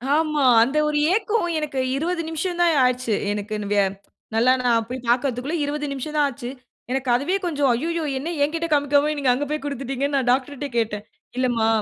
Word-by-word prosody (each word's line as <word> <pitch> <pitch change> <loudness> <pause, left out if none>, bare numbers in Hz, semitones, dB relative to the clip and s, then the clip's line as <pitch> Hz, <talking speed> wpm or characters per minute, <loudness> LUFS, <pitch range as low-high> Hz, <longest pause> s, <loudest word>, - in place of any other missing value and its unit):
ஆமா. 305 -1 +1 0.2
அந்த 270 +6 -1
ஒரு 300 0 0 0.2
ஏக்கம். 430 -2 +1
எனக்கு 290 -3 -3 0.2
20 335 +4 -1
நிமிஷம் 345 +2 -3
தான் 340 -1 +4
ஆச்சு. 250 -2 -1 0.2
எனக்குன்னு 210 0 -4
வியா 200 -1 +4 0.5
நல்லா 235 +3 +4
நான் 235 -2 +2
போய் 250 0 -6
பார்க்கறதுக்குள்ள 255 +4 0
20 295 +1 -3
நிமிஷம் 275 +3 -5
தான் 295 - +4
ஆச்சு. 245 -2 -7 0.4
எனக்கு 265 0 -1
அதுவே 285 +10 0
கொஞ்சம் 290 -5 +1
ஐய்யய்யோ! 330 +7 -2
என்ன 285 +5 -4
என்கிட்ட 330 +3 -1
காமிக்காம 290 +1 +3
நீங்க 275 -3 +1
அங்க 275 +4 -1
போய் 305 0 -2
குடுத்துட்டீங்கன்னு 275 0 -2
நான் 260 -2 -1
டாக்டர்ட்டயே 280 +2 -1
கேட்டேன் 215 -3 -1 0.3
"இல்லம்மா 245 -3 +1
280 Hz, 175 wpm, -23 LUFS, 245-305 Hz, 0.5 s, தான்